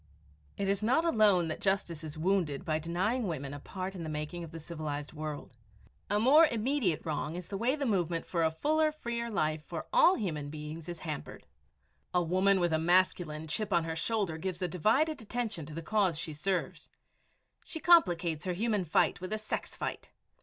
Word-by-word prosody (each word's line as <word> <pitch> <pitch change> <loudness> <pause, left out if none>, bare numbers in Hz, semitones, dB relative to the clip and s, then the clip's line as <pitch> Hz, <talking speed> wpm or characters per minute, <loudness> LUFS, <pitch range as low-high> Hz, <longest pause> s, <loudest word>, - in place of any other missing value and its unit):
It 200 - -1
is 200 +1 +1
not 260 +10 +2
alone 210 - +4
that 155 - -4
justice 185 -5 0
is 155 0 -7
wounded 170 -3 0
by 155 -2 0
denying 190 +9 -1
women 140 -5 -4
a 145 - -6
part 185 +5 -5
in 185 - -7
the 160 - -4
making 155 +3 -4
of 165 - -7
the 165 +1 -8
civilized 155 -3 -5
world 155 -1 -6 0.6
a 205 +1 +2
more 295 +8 +7
immediate 235 - 0
wrong 155 0 -2
is 180 -1 -7
the 195 - -3
way 250 +5 +2
the 290 -2 -2
movement 175 -7 0
for 170 -2 0
a 160 - +4
fuller, 310 - +1
freer 235 -6 -4
life 155 -7 0
for - - -6
all - - +6
human 155 - -3
beings 155 +2 -7
is 175 -1 -6
hampered. 155 -4 -6 0.7
A 180 - +4
woman 185 +3 +3
with 175 -2 +1
a 160 - +2
masculine 170 -2 +2
chip 200 +7 -2
on 170 -2 +3
her 165 0 -3
shoulder 170 -1 -1
gives 185 +1 -3
a - - +1
divided 240 - +1
attention 225 -8 -3
to 155 - -8
the 165 - -5
cause 190 -4 +1
she 160 -1 -4
serves. 175 0 -2 0.7
She 320 - -7
complicates 175 - +4
her 180 - 0
human 210 0 0
fight 160 - +2
with 185 - -5
a 215 - 0
sex 215 0 -4
fight. - - -5
180 Hz, 195 wpm, -31 LUFS, 160-215 Hz, 0.7 s, more